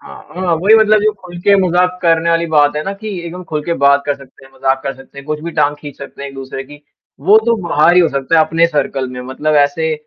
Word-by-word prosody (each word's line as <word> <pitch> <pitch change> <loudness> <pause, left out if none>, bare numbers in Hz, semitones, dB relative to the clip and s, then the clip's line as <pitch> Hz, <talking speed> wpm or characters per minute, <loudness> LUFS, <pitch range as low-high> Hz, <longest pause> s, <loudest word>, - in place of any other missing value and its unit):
हाँ, - - -12 0.2
हाँ, 180 -2 0
वही 200 +7 +4
मतलब 215 -1 +4
जो 215 0 +2
खुल 175 -1 -10
के 200 +2 +4
मज़ाक 180 +1 +1
करने 165 0 +2
वाली 170 0 +1
बात 145 0 +3
है 150 - -2
ना, 195 - -3
कि 200 +2 -8 0.2
एकदम 180 +2 -8
खुल 155 -3 -4
के 170 +1 -1
बात 140 0 +4
कर 145 - 0
सकते 135 -1 -17
हैं, 135 - -19
मज़ाक 135 0 0
कर 135 - -3
सकते 135 +1 -15
हैं, 140 - -10
कुछ 150 0 -3
भी 170 - -4
टाँग 145 +1 +1
खींच 145 -2 -10
सकते 140 0 -10
हैं 140 - -5
एक-दूसरे 135 0 -7
की। 145 +2 -15 0.4
वो 200 +9 +5
तो 230 -1 +3
बाहर 155 +4 +4
ही 180 - +6
हो 170 - +3
सकता 140 +3 0
है 160 - +5
अपने 165 +2 +2
सर्कल 140 -4 -2
में 125 0 -7
मतलब 130 +4 -2
ऐसे 150 +2 +1
155 Hz, 270 wpm, -15 LUFS, 140-175 Hz, 0.4 s, ही